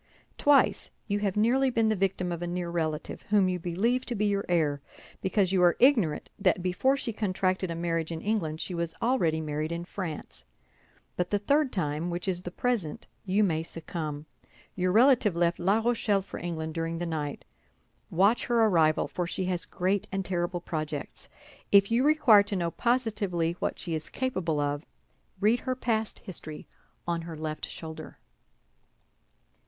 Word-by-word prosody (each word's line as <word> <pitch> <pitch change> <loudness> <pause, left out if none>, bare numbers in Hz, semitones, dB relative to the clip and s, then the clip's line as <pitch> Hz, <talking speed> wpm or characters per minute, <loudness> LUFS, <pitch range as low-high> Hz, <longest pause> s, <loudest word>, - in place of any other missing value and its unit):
Twice 290 -1 +4 0.2
you 205 -1 0
have 205 -1 -1
nearly 255 +5 +3
been 225 -3 +2
the 215 - +2
victim 185 -2 -1
of 170 0 -4
a 175 - -2
near 175 0 -3
relative, 160 -3 -3
whom 205 -2 +4
you 180 -1 -1
believe 205 +10 0
to 240 - -2
be 210 0 0
your 200 -1 +1
heir 150 -5 +1 0.4
because 190 -1 +1
you 190 -2 +3
are 175 -1 +5
ignorant 225 - +3
that 185 -2 +2
before 225 +10 +2
she 235 -4 -3
contracted 185 -3 0
a 165 - -3
marriage 165 -1 -1
in 165 - -3
England 165 -6 -1
she 185 - -2
was 170 -1 -3
already 175 -11 +1
married 155 +1 -3
in 170 +1 -4
France. 175 -4 -6 0.7
But 180 0 -1
the 205 - +2
third 280 +6 +2
time, 155 -2 -1
which 175 +2 -4
is 180 -2 -1
the 180 - -5
present, 200 -5 -2 0.2
you 200 +2 +2
may 160 -5 +1
succumb. 155 -2 -5 0.5
Your 185 0 +1
relative 230 -3 +5
left 170 0 +1
La 195 +5 +3
Rochelle 225 -4 +1
for - - -8
England 160 -2 -4
during 165 0 -2
the 175 - -3
night. 150 -3 -4 0.6
Watch 200 +7 +3
her 235 -2 +4
arrival, 160 -6 +3
for 175 -1 -3
she 185 +1 -2
has 180 -1 -2
great 190 +2 -1
and 195 -1 -2
terrible 175 -1 -1
projects. 155 -3 -5 0.4
If 200 +1 +6
you 240 +3 +3
require 285 -8 +6
to 200 0 -3
know 170 -2 -1
positively 205 -9 0
what - - -2
she 170 - -4
is 155 -1 -4
capable 185 - -1
of, 145 +1 -1 0.6
read 215 +4 +3
her 255 -1 -2
past 225 -4 -1
history 155 -5 -8 0.4
on 170 -1 0
her 165 -1 -7
left 155 0 -4
shoulder." 160 -1 -8
180 Hz, 175 wpm, -28 LUFS, 165-210 Hz, 0.7 s, If